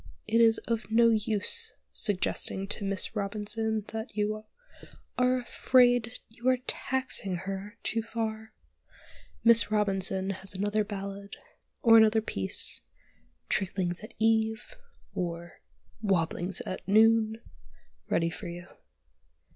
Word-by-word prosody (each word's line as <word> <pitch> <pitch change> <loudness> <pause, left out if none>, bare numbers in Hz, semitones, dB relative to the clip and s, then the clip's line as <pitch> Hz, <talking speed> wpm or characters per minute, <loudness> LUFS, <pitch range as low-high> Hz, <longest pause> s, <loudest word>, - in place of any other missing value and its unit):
It 230 - +3
is 225 -1 +5
of 230 -1 -2
no 230 +1 +5
use 215 -1 0 0.2
suggesting 195 -1 -1
to 205 - -3
Miss 195 +2 -2
Robinson 210 +1 -2
that 220 0 -6
you 215 0 -2 0.7
"are 250 0 +2
afraid 245 -1 +3
you 235 +2 -7
are 255 - +3
taxing 255 -8 -1
her 195 +4 -6
too 225 - -1
far." 220 -1 -4 0.9
Miss 230 -1 +6
Robinson 195 -2 +1
has 190 0 -2
another 205 +2 0
ballad, 200 -1 -7 0.5
or 225 -1 +8
another 220 0 +5
"piece" 95 - -2 0.7
"Tricklings 185 -1 -1
at 215 - -11
Eve," 220 0 +1 0.4
or 170 -1 -5 0.4
"Wobblings 180 -2 0
at 185 - -5
Noon," 220 +1 +4 0.7
ready 165 0 +1
for 185 +2 -7
you. 175 0 -7
215 Hz, 115 wpm, -29 LUFS, 195-225 Hz, 0.9 s, or